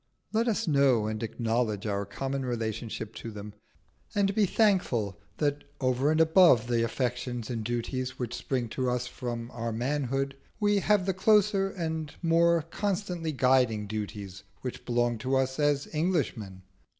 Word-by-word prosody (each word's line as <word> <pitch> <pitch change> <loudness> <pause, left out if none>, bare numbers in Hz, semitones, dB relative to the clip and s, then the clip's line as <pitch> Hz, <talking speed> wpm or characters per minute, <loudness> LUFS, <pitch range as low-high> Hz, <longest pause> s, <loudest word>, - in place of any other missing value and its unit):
Let 225 +2 +2
us 225 -2 0
know 140 -7 +4
and 110 0 -3
acknowledge 115 -2 -1
our 100 -1 -1
common 135 +5 -3
relationship 115 -2 -3
to 115 - -6
them, 105 -1 -8 0.6
and 200 -1 +2
be 210 -1 +3
thankful 125 - +1 0.2
that 145 -1 0 0.2
over 130 +2 +1
and 155 +1 +2
above 160 - +6
the 120 -1 +1
affections 120 0 -2
and 115 -2 -3
duties 125 +3 -3
which 125 -1 -4
spring 125 -1 -2
from 125 -1 -3
our 115 -1 -3
manhood, 135 +3 -1 0.2
we 205 -1 +3
have 200 -1 +2
the 190 - +1
closer 200 0 +3
and 160 -5 -4
more 170 0 +4
constantly 180 -2 -2
guiding 125 -6 +3
duties 100 -2 -5 0.2
which 125 - -6
belong 120 -1 +1
to 130 +3 0
us 130 +1 0
as 145 -1 +2
Englishmen." 125 - -1
130 Hz, 145 wpm, -29 LUFS, 115-165 Hz, 0.6 s, above